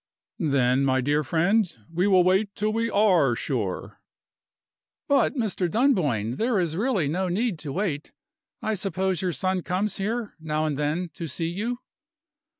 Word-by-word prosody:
"Then, 135 -5 +2
my 130 -1 +2
dear 145 +4 +1
friend, 175 +7 +2 0.2
we 180 +4 +2
will 185 -3 +5
wait 190 +3 +2
till 215 +1 0
we 230 +1 0
are 180 - +3
sure." 110 -9 -3 1.1
"But, 280 +1 +3
Mr. 210 -7 -1
Dunboyne, 150 - +1
there 230 -2 +1
is 165 -3 -1
really 205 - +1
no 180 +6 -1
need 200 -1 0
to 150 -3 -5
wait. 160 -4 -2 0.5
I 220 - 0
suppose 190 -3 -1
your 185 -2 0
son 185 +2 -1
comes 190 +3 -1
here, 220 +3 -2
now 155 -1 -1
and 150 -2 -1
then, 150 +5 -1
to 165 - -5
see 165 +3 -2
you?" 230 +8 -3
180 Hz, 155 wpm, -25 LUFS, 150-210 Hz, 1.1 s, will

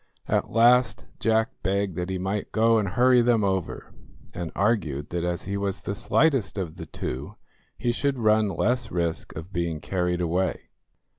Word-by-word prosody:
At - - 0
last 120 +2 +4
Jack 110 0 +2
begged 100 -2 -1
that 90 +1 -3
he 95 - -2
might 95 +3 -3
go 115 +1 +4
and 105 - -1
hurry 125 +5 +4
them 115 -2 +3
over, 95 -3 -2 0.4
and 85 -2 -5
argued 85 - 0
that 85 -1 -2
as 90 0 -2
he 100 +1 -3
was 100 0 -3
the 100 - -2
slightest 135 0 +1
of 90 -3 -4
the 80 -2 -7
two, 65 0 -5 0.4
he 120 - 0
should 140 +2 -1
run 110 -2 +3
less 120 +7 0
risk 85 -2 -2
of 80 +5 -8
being 85 -2 -1
carried 90 +1 -1
away. 90 +2 -1
100 Hz, 170 wpm, -25 LUFS, 90-115 Hz, 0.4 s, last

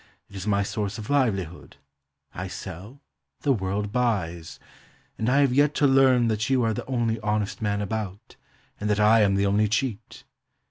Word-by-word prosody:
It - - -13
is 95 +1 -6
my 100 -1 +2
source 100 0 -3
of 110 +4 -6
livelihood. 95 - -1 0.6
I 90 +4 -5
sell: 95 - -9 0.4
the 140 - +2
world 100 -1 -2
buys. 95 -9 -2 0.6
And 110 - 0
I 140 +3 +4
have 135 -3 +3
yet 145 +2 +3
to 145 - +2
learn 135 -3 +4
that 110 +1 -1
you 130 -2 +2
are 115 -1 +1
the - - -6
only 120 -3 -1
honest 105 -1 -2
man 105 -1 -1
about, 105 -1 -5 0.4
and 105 - -2
that 105 0 +1
I 110 +2 +5
am 100 -2 +3
the 100 0 +1
only 105 +2 +2
cheat. 110 +1 -3
105 Hz, 180 wpm, -25 LUFS, 100-125 Hz, 0.6 s, I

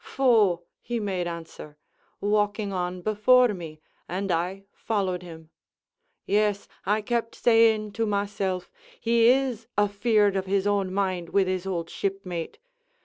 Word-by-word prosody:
'Pho,' 215 -10 +3 0.2
he 240 0 -3
made 190 -4 -2
answer, 165 -3 -8 0.4
walking 205 0 0
on 180 -1 -3
before 235 +5 +4
me, 165 -6 -6 0.3
and 190 +2 -2
I 180 +4 -1
followed 190 -5 -2
him. 160 -2 -12 0.7
"'Yes,' 205 0 +1 0.2
I 210 +2 +2
kept 230 0 -2
saying 225 -2 +3
to 225 +2 -1
myself, 200 -3 -2 0.3
'he 230 0 +3
is 250 -3 +2
afeard 205 0 +2
of 190 0 -2
his 195 0 +1
own 200 -2 +1
mind 185 -3 -1
with 200 -1 +3
his 185 0 -2
old 170 -3 -3
shipmate.' 190 -4 -4
200 Hz, 135 wpm, -26 LUFS, 180-215 Hz, 0.7 s, before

